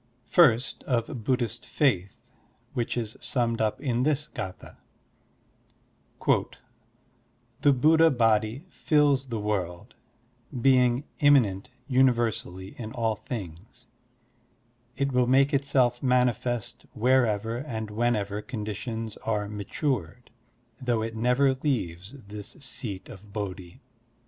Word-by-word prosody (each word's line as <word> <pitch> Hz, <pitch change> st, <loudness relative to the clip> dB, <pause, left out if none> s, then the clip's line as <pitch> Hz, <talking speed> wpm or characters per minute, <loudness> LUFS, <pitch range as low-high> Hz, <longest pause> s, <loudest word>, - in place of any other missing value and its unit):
First, 130 Hz, -7 st, +4 dB
of 120 Hz, 0 st, -1 dB
Buddhist 120 Hz, -1 st, -1 dB
faith, 100 Hz, -10 st, 0 dB, 0.6 s
which 120 Hz, 0 st, -2 dB
is 110 Hz, -2 st, -3 dB
summed 115 Hz, -3 st, 0 dB
up 105 Hz, -1 st, 0 dB
in 125 Hz, -3 st, 0 dB
this 150 Hz, +2 st, +1 dB
g4th4: 95 Hz, 0 st, -7 dB, 2.8 s
"The 145 Hz, -, +5 dB
Buddha 160 Hz, +5 st, +5 dB
Body 115 Hz, +1 st, +1 dB
fills 145 Hz, -6 st, +2 dB
the 115 Hz, -3 st, -3 dB
world, 105 Hz, -1 st, -3 dB, 0.7 s
Being 125 Hz, 0 st, +4 dB, 0.2 s
immanent 125 Hz, -8 st, +4 dB, 0.2 s
tiniversally 120 Hz, -8 st, +1 dB
in 110 Hz, -2 st, -5 dB
all 115 Hz, -2 st, 0 dB
things; 110 Hz, +2 st, -8 dB, 1.1 s
It 140 Hz, 0 st, 0 dB
will 125 Hz, -1 st, +2 dB
make 135 Hz, +3 st, +4 dB
itself 130 Hz, -3 st, +2 dB
manifest 125 Hz, -2 st, 0 dB
wherever 115 Hz, -2 st, +2 dB
and 110 Hz, -5 st, -5 dB
whenever 105 Hz, -2 st, 0 dB
conditions 110 Hz, 0 st, -5 dB
are 105 Hz, -2 st, -2 dB
matured, 105 Hz, -, -3 dB, 0.5 s
Though 120 Hz, -3 st, 0 dB
it 115 Hz, 0 st, -4 dB
never 125 Hz, +4 st, +3 dB
leaves 105 Hz, -, -3 dB
this 105 Hz, 0 st, -8 dB
Seat 115 Hz, -8 st, -5 dB
of 105 Hz, -3 st, -13 dB
Bodhi." 95 Hz, -4 st, -6 dB
120 Hz, 105 wpm, -27 LUFS, 105-130 Hz, 2.8 s, The